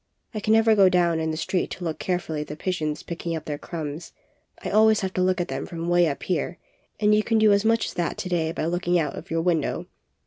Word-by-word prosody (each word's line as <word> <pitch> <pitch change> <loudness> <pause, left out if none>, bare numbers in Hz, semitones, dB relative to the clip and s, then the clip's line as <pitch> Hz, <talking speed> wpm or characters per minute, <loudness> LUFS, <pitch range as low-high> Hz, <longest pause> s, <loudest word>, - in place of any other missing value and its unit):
I 215 - -3
can 215 +1 +1
never 225 0 +5
go 195 -2 +6
down 175 -3 +2
in 160 0 -1
the 160 - -3
street 180 +2 -1
to 180 - -8
look 160 -2 -3
carefully 175 -4 -2
at 150 - -6
the 150 - -6
pigeons 155 -3 -3
picking 170 0 -4
up 155 - -6
their 145 -1 -4
crumbs. 160 -1 -6 0.5
I^always 220 0 +4
have 190 -1 -3
to 185 - 0
look 185 0 +2
at 175 - -1
them - - -4
from 165 -1 -6
away 175 0 +4
up 140 - -3
here, 175 0 -2 0.4
and 210 0 +4
you 210 - +4
can 225 +1 +1
do 215 -1 +5
as 200 0 +2
much 225 0 +2
as - - -5
that 175 -1 -2
to 185 - -4
day 165 -3 0
by 155 - -3
looking 175 +1 +1
out 150 -5 -1
of - - -9
your 165 0 0
window. 165 -4 0
175 Hz, 255 wpm, -25 LUFS, 160-195 Hz, 0.5 s, go